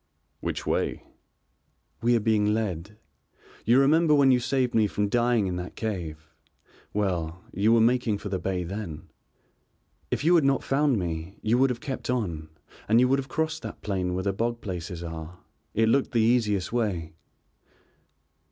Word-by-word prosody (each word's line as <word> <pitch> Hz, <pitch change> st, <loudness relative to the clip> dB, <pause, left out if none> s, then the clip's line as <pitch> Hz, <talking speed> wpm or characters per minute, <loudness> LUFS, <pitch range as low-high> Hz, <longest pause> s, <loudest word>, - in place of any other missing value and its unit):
"Which -, -, -4 dB
way?" -, -, -1 dB, 1.0 s
"We 120 Hz, +1 st, +3 dB
are -, -, +3 dB
being 105 Hz, -1 st, +2 dB
led. 105 Hz, -2 st, -3 dB, 0.7 s
You 120 Hz, +4 st, +5 dB
remember 150 Hz, +3 st, +4 dB
when 140 Hz, -2 st, +5 dB
you 125 Hz, -, +4 dB
saved 130 Hz, 0 st, 0 dB
me 110 Hz, -2 st, +4 dB
from 105 Hz, 0 st, -1 dB
dying 120 Hz, -2 st, +2 dB
in 90 Hz, -1 st, -2 dB
that 90 Hz, 0 st, -6 dB
cave, 85 Hz, -8 st, -4 dB, 0.6 s
well, 90 Hz, -4 st, -2 dB
you 105 Hz, +4 st, +2 dB
were 115 Hz, -1 st, +5 dB
making 115 Hz, -2 st, +2 dB
for 105 Hz, -, -7 dB
the 95 Hz, -1 st, -2 dB
bay 90 Hz, 0 st, -2 dB
then. 90 Hz, -3 st, -6 dB, 1.0 s
If -, -, -1 dB
you 170 Hz, +3 st, +4 dB
had 165 Hz, -3 st, +5 dB
not 135 Hz, 0 st, +2 dB
found 140 Hz, -2 st, +2 dB
me 85 Hz, 0 st, -4 dB
you 115 Hz, +3 st, +2 dB
would 135 Hz, +1 st, +4 dB
have 120 Hz, -1 st, -3 dB
kept 135 Hz, -3 st, -5 dB
on 85 Hz, -11 st, -2 dB, 0.4 s
and 115 Hz, +2 st, +5 dB
you 125 Hz, -, +5 dB
would 135 Hz, +1 st, +3 dB
have 135 Hz, 0 st, -6 dB
crossed 160 Hz, -1 st, -1 dB
that 110 Hz, -, -8 dB
plain 90 Hz, -3 st, -1 dB
where 95 Hz, -, -2 dB
the 100 Hz, 0 st, 0 dB
bog 115 Hz, +3 st, -1 dB
places 90 Hz, -2 st, -5 dB
are, 80 Hz, +1 st, -7 dB, 0.4 s
it 110 Hz, +1 st, +3 dB
looked 135 Hz, +4 st, +2 dB
the 115 Hz, -, +3 dB
easiest 110 Hz, -4 st, +1 dB
way." 90 Hz, -9 st, -1 dB
110 Hz, 170 wpm, -26 LUFS, 90-125 Hz, 1.0 s, You